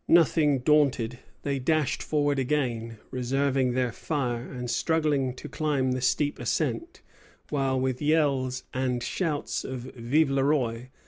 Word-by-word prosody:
Nothing 155 -5 +4
daunted, 125 -5 +2 0.2
they 140 -1 -1
dashed 155 +1 +1
forward 145 -2 +1
again, 120 -5 -1
reserving 130 0 +1
their 125 -1 +1
fire, 125 -2 -3
and 125 -1 -5
struggling 145 0 +1
to - - -8
climb 140 -4 0
the 130 0 -1
steep 145 +3 +1
ascent; 345 +1 -2 0.5
while, 135 -3 +1
with 130 -1 -1
yells 140 -4 +1
and 125 -2 -1
shouts 155 0 -2
of 130 -2 -5
Vive 135 +5 +2
le 135 -1 +2
Roi! 130 -4 0
135 Hz, 135 wpm, -27 LUFS, 125-150 Hz, 0.5 s, Nothing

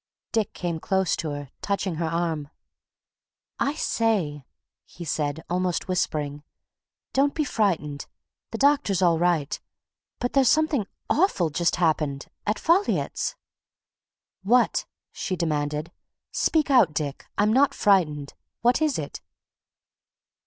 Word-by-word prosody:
Dick 220 -4 0
came 170 -2 -3
close 190 0 +1
to 160 - -3
her, 145 -2 -6
touching 195 -4 -1
her 165 0 -1
arm. 160 -3 -1 1.1
"I 280 +2 +1
say!" 190 - 0 0.4
he 170 - -10
said, 150 0 -2
almost 180 0 -1
whispering. 150 -6 -1 0.7
"Don't 280 +1 +2
be 310 - +1
frightened 165 - -1 0.4
the 225 - -4
doctor's 270 -9 +3
all 170 -2 +4
right 170 -5 +1 0.6
but 245 - -2
there's 270 -3 +5
something 305 -9 +2 0.2
awful 285 - +2
just 170 +3 +1
happened. 150 -5 0 0.2
At 210 - +1
Folliot's." 370 +7 +1 1.1
"What" 235 +6 +3 0.3
she 185 - -3
demanded. 150 -1 -1 0.4
"Speak 310 -3 +1
out, 245 - +5
Dick! 145 -2 -3
I'm 210 +2 +3
not 275 +2 +4
frightened. 150 -8 +2 0.3
What 245 +5 +3
is 305 -4 +2
it?" 145 -2 -5
180 Hz, 120 wpm, -25 LUFS, 150-235 Hz, 1.1 s, there's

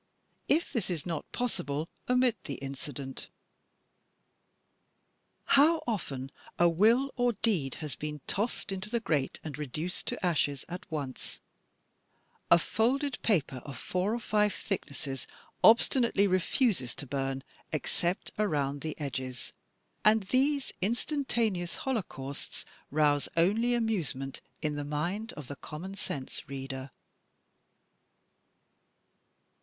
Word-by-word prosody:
If 320 +4 +2
this 220 -7 0
is 165 -5 -2
not 165 -4 -3
possible, 155 - -1 0.2
omit 250 -2 +3
the 140 - -3
incident. 135 0 -6 2.2
How 310 +4 +5
often 140 - -2 0.3
a 175 - +6
will 225 +11 +4
or 245 0 +4
a - - +1
deed 170 - +2
has 145 - -2
been 150 +4 -4
"tossed 210 0 -1
into 190 +2 -3
the 235 +1 +1
grate 150 -11 0
and 155 -3 -5
reduced 150 +5 -3
to - - -1
ashes 145 -5 +1
at 180 -1 -7
once," 140 -5 -4 1.1
A 170 - +9
folded 255 - +1
paper 160 - +2
of 130 0 -8
four 185 - 0
or - - -2
five 210 -2 +2
thicknesses 140 -8 -4 0.4
obstinately 230 -2 +6
refuses 185 - +2
to - - -5
bum, 135 0 -2 0.3
except 175 +4 -1
around 145 -8 +1
the 155 0 -4
edges, 130 -3 -4 0.5
and 215 0 +6
these 270 +7 +2
instantaneous 230 - 0
holocausts 145 - -3 0.2
rouse 145 -1 +3
only 220 +8 +4
amusement 170 - -1 0.2
in 150 -1 +1
the 145 0 -2
mind 175 +10 -2
of 145 -4 -8
the 145 - -5
common 170 +8 -6
sense 140 -11 -5
reader. 135 0 -5
175 Hz, 115 wpm, -31 LUFS, 140-225 Hz, 2.2 s, A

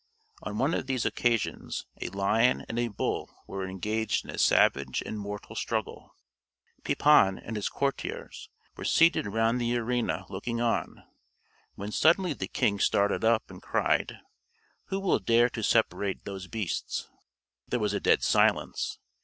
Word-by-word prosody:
On 105 0 -5
one 140 +8 +1
of - - -2
these 130 -3 -1
occasions 120 -3 -1 0.2
a - - -2
lion 100 +6 +2
and 115 - -3
a 120 - +1
bull 105 - -3 0.2
were 95 -1 -5
engaged 105 +3 -1
in - - -7
a - - -6
savage - - +3
and 110 - -5
mortal 105 0 -7
struggle. - - -4 0.7
Pepin 120 -11 +4
and 115 - -7
his 105 - -1
courtiers 140 0 -4 0.3
were - - -8
seated 165 -9 +4
round 115 +4 +1
the 120 0 +1
arena 115 -7 -1
looking 115 +5 -4
on, 120 -1 -1 0.7
when 100 +1 -6
suddenly 170 - +3
the 95 -8 -5
king 100 0 0
started 100 +2 +2
up, 115 0 +2
and - - -11
cried: - - 0 0.7
"Who 195 - -3
will 195 -9 +2
dare 115 +4 +3
to 115 - -5
separate 100 -3 +1
those 95 -2 -6
beasts?" 105 -5 -3 0.6
There 125 - -1
was 105 -2 0
a 100 - 0
dead - - +3
silence. - - +2
110 Hz, 155 wpm, -28 LUFS, 100-120 Hz, 0.7 s, Pepin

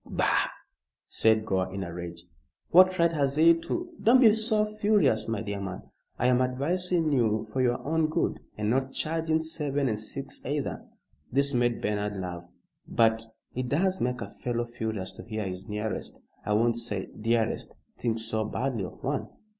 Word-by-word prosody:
"Bah!" - - +2 0.6
said 110 -1 +3
Gore, 95 -1 0
in 95 0 -4
a 85 -2 -6
rage. 85 -1 -7 0.5
"What 185 +1 +7
right 170 -1 +3
has 140 -3 +1
he 165 +2 +7
to 350 - -3
" - - -16
"Don't 245 +3 +6
be 225 -5 +7
so 215 -1 +2
furious, 205 - +2
my 115 -1 -1
dear 100 -2 -4
man. 95 -1 -5 0.3
I - - 0
am 125 0 +4
advising 160 +6 +1
you 110 -5 +2
for 130 - +1
your 120 -1 +2
own 160 +1 +1
good, 160 +2 -1 0.2
and 105 0 0
not 135 +1 0
charging 160 0 0
seven 150 -3 -1
and 110 -3 -1
six 135 +5 -5
either." 145 +1 -3 0.4
This 140 +2 +2
made 120 -1 +1
Bernard 105 -1 -1
laugh. 90 -1 -5 0.4
"But 115 -1 +3 0.3
it 125 0 -3
does 185 +6 +1
make 125 0 -1
a - - -6
fellow 120 -1 -2
furious 110 -5 -4
to - - -8
hear 110 -2 -4
his 95 +1 -7
nearest 105 0 -4 0.2
I 105 - 0
won't 115 +2 +3
say 105 -5 -2
dearest 115 0 -1 0.2
think 115 -2 0
so 110 -1 0
badly 115 -1 -2
of 90 - -11
one." - - -1
120 Hz, 180 wpm, -28 LUFS, 110-160 Hz, 0.6 s, What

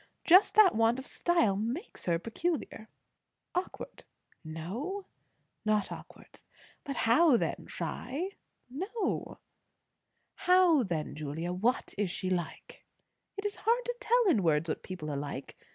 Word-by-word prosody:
Just 370 +4 +6
that 425 -4 +7
want 225 +2 +3
of 265 - -7
style 335 - +2
makes 235 - -4
her 170 -2 +2
peculiar." 230 - -3 0.7
"Awkward?" 360 +1 -4 0.4
"No." 215 - -5 0.6
"Not 215 -2 +1
awkward. - - -11 0.5
How 275 +2 +4
then? - - -3
Shy?" 300 +9 -4 0.4
"No." 380 - -3 1.0
"How 365 -5 +4
then, 170 -9 -2
Julia? 155 +4 -4
What 225 +8 0
is 205 -3 +1
she 185 +1 -3
like?" 175 -3 -4 0.5
"It 400 - -5
is 415 +1 -2
hard 475 +2 +1
to 485 - -2
tell 485 -2 +3
in 230 - +4
words 160 -2 +2
what 155 - -2
people 175 -5 -6
are - - -3
like. 140 -1 -5
235 Hz, 130 wpm, -31 LUFS, -, 1.0 s, that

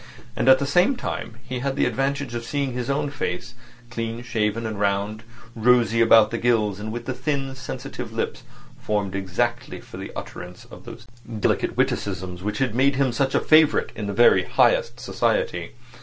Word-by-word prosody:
And 130 - +2
at 130 - +8
the 140 - -2
same 175 - +3
time 115 - -5
he 130 -1 -5
had 135 +1 -2
the - - +2
advantage 135 +1 -1
of 120 0 -4
seeing 140 +1 -2
his 125 0 -4
own 145 +1 0
face, 120 -3 -4 0.4
clean 115 +1 -4
shaved 110 -3 -1
and 110 -3 -4
round, 100 +1 0 0.3
rosy 115 0 +3
about 115 -1 +6
the 115 - -2
gills, 110 -4 +1
and 110 +1 -5
with 120 +1 -5
the 130 - -2
thin 135 -1 -2
sensitive 135 - -7
lips - - -3 0.4
formed 105 -3 -2
exactly 95 -2 -2
for - - -12
the - - -7
utterance - - -8
of - - -14
those - - -10 0.3
delicate - - 0
witticisms 95 -2 -1
which 105 +2 -3
had 130 -4 0
made 135 +3 +3
him 135 -2 +2
such 135 +3 0
a - - +5
favourite 155 -1 +4
in 105 - -4
the - - -2
very 120 +4 +5
highest - - +2
society. - - -1
120 Hz, 185 wpm, -23 LUFS, 105-135 Hz, 0.4 s, at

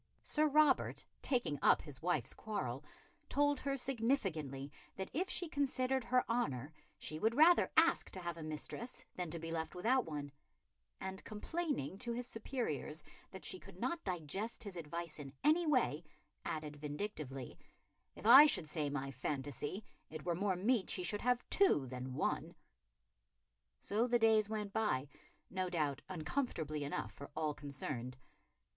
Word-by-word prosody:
Sir 305 0 +2
Robert, 295 -2 +3 0.2
taking 240 - 0
up - - +5
his 145 -4 -9
wife's 175 +2 0
quarrel, 140 - -3 0.5
told 290 0 +3
her 275 0 -1
significantly 195 - 0 0.2
that 190 0 -5
if 360 +7 0
she 355 - -1
considered 265 -3 +1
her 250 +1 +2
honour 150 - -1 0.2
she 155 - -5
would 225 +5 +2
rather 330 +5 +6
ask 330 +1 +5
to 190 - -6
have 175 -2 -3
a 165 - -8
mistress 155 +10 -4
than 180 -2 -3
to 170 - -4
be 165 0 -5
left 160 -1 -3
without 240 +8 +2
one; 145 -2 -5 0.7
and, 190 0 -5
complaining 220 - -3
to 235 +1 -2
his 245 +1 -3
superiors 225 - -3 0.3
that - - -6
she - - -1
could - - -13
not 340 -1 -1
digest 185 +6 -2
his 200 -4 -7
advice 170 0 -5
in 140 -2 -7
any 320 +3 +4
way, 245 - +2 0.4
added 155 -2 -4
vindictively, 145 - -5 0.6
"If - - -11
I 265 +7 +11
should 165 - +2
say 150 -1 0
my 135 -1 -3
phantasy, 145 - -3 0.2
it 155 +1 -7
were 175 - +1
more 190 +2 +1
meet 205 +2 +2
she 180 - -2
should 205 +3 -1
have 250 0 +1
two 375 - +5
than 130 0 -5
one." - - -1 1.2
So 220 +4 +1
the 240 0 +4
days 220 -2 +4
went 210 -2 -3
by, 145 -12 +1 0.4
no 185 -1 -1
doubt 150 -5 0
uncomfortably 160 - -2
enough 145 - -3
for 140 - -9
all 155 -1 0
concerned. 135 -4 -5
185 Hz, 155 wpm, -37 LUFS, 150-245 Hz, 1.2 s, I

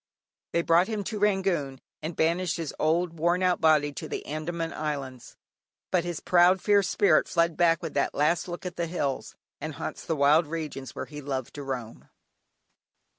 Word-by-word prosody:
They 170 - +2
brought 170 +2 +4
him 215 -2 -2
to 210 +2 -4
Rangoon 190 -10 +1 0.2
and 160 +1 -5
banished 170 +2 +1
his 165 -3 -4
old, 165 +1 +1
worn 175 +3 +2
out 180 -1 +2
body 150 -2 +4
to - - -6
the - - -4
Andaman 165 +2 -4
Islands, 140 -5 -5 0.6
but 180 -2 +2
his 175 -3 -3
proud, 180 +1 +4
fierce 200 -1 +3
spirit 185 -7 +3
fled 170 -1 +1
back 165 -2 +3
with - - -4
that 140 - 0
last 155 +4 +1
look 175 +1 -6
at 180 0 -5
the 170 - -1
hills, 145 -5 -3 0.2
and - - -5
haunts - - -5
the 160 - -1
wild 150 +3 +4
regions 150 -5 -5
where - - -4
he 150 -1 -9
loved 135 -3 -4
to 145 - -7
roam. 130 -5 -6
165 Hz, 180 wpm, -27 LUFS, 145-175 Hz, 0.6 s, brought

